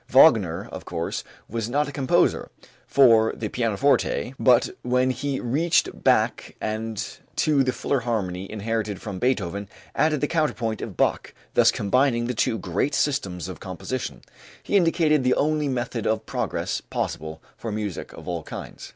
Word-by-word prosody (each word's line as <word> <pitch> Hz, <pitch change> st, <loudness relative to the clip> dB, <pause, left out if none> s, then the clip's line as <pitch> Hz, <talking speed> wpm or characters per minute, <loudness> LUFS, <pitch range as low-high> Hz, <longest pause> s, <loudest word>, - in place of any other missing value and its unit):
Wagner, -, -, +5 dB
of -, -, -7 dB
course, -, -, -3 dB, 0.2 s
was 115 Hz, 0 st, -3 dB
not 145 Hz, +3 st, +1 dB
a -, -, -5 dB
composer 135 Hz, -2 st, +2 dB, 0.4 s
for 115 Hz, -5 st, +5 dB
the 110 Hz, -, -4 dB
pianoforte, 125 Hz, +2 st, +1 dB
but 125 Hz, -2 st, +4 dB
when 125 Hz, +1 st, +2 dB
he 135 Hz, +2 st, -2 dB
reached 155 Hz, +8 st, +1 dB
back -, -, +2 dB
and 110 Hz, 0 st, -4 dB, 0.2 s
to 145 Hz, -3 st, +3 dB
the 130 Hz, -, +1 dB
fuller 140 Hz, +2 st, -1 dB
harmony 95 Hz, -6 st, -3 dB
inherited 110 Hz, -1 st, -2 dB
from 100 Hz, -4 st, -6 dB
Beethoven 100 Hz, -5 st, -1 dB, 0.2 s
added 155 Hz, -1 st, +2 dB
the 145 Hz, -, 0 dB
counterpoint 115 Hz, -10 st, -1 dB
of -, -, -6 dB
Bach, -, -, 0 dB, 0.2 s
thus -, -, +6 dB
combining 120 Hz, +3 st, +2 dB
the 125 Hz, -, -1 dB
two 115 Hz, 0 st, +1 dB
great 100 Hz, -, -1 dB
systems 95 Hz, -, -1 dB
of 95 Hz, -, -7 dB
composition, 105 Hz, +7 st, -5 dB, 0.4 s
he -, -, -1 dB
indicated 165 Hz, -5 st, +3 dB
the 125 Hz, 0 st, +3 dB
only 150 Hz, 0 st, +1 dB
method 120 Hz, -3 st, -2 dB
of 110 Hz, 0 st, 0 dB
progress -, -, -2 dB
possible 80 Hz, 0 st, -3 dB, 0.2 s
for 115 Hz, -, -5 dB
music 105 Hz, -4 st, -4 dB
of -, -, -12 dB
all 85 Hz, -2 st, -2 dB
kinds. -, -, -8 dB
120 Hz, 155 wpm, -24 LUFS, 105-140 Hz, 0.4 s, thus